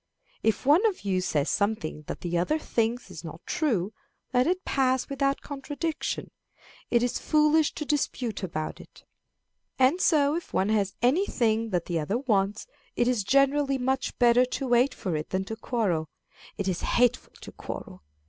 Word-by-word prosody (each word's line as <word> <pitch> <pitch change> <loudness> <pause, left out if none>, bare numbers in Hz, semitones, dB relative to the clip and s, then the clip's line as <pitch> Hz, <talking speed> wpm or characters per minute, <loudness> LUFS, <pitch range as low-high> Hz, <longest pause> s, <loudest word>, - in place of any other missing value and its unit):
If 220 +2 0
one 300 - +5
of 410 - -3
you 185 -2 +1
says 150 -5 0
something 200 -8 -1
that - - -6
the 175 -1 -3
other 180 - +1
thinks 235 -4 -1
is - - -9
not - - -9
true, 225 - 0 0.4
let 250 +2 +3
it 365 +1 0
pass 260 -1 +1
without 275 0 0
contradiction; 290 +3 -4 0.6
it 235 -1 +3
is 245 0 -1
foolish 305 0 +3
to 300 - -4
dispute 265 -6 -1
about 155 -4 -4
it. - - -17 0.7
And 270 +8 +3
so 290 -3 +4
if 340 - -6
one 190 +2 +2
has 200 -3 +1
any 320 +12 +3
thing 225 -1 +1
that 180 -4 -1
the 170 -2 -1
other 175 +9 -1
wants, 210 -5 0 0.3
it 240 - +2
is 245 -5 +1
generally 275 +3 +3
much 265 +1 -1
better 240 0 +5
to 255 +2 -3
wait 245 +3 +3
for 185 -7 -3
it 155 0 -4
than 190 0 -1
to 220 - -5
quarrel. 200 - -1 0.5
It 200 - -2
is 180 -2 -1
hateful 245 -1 +1
to - - -10
quarrel. 90 - -8
245 Hz, 175 wpm, -27 LUFS, 195-275 Hz, 0.7 s, one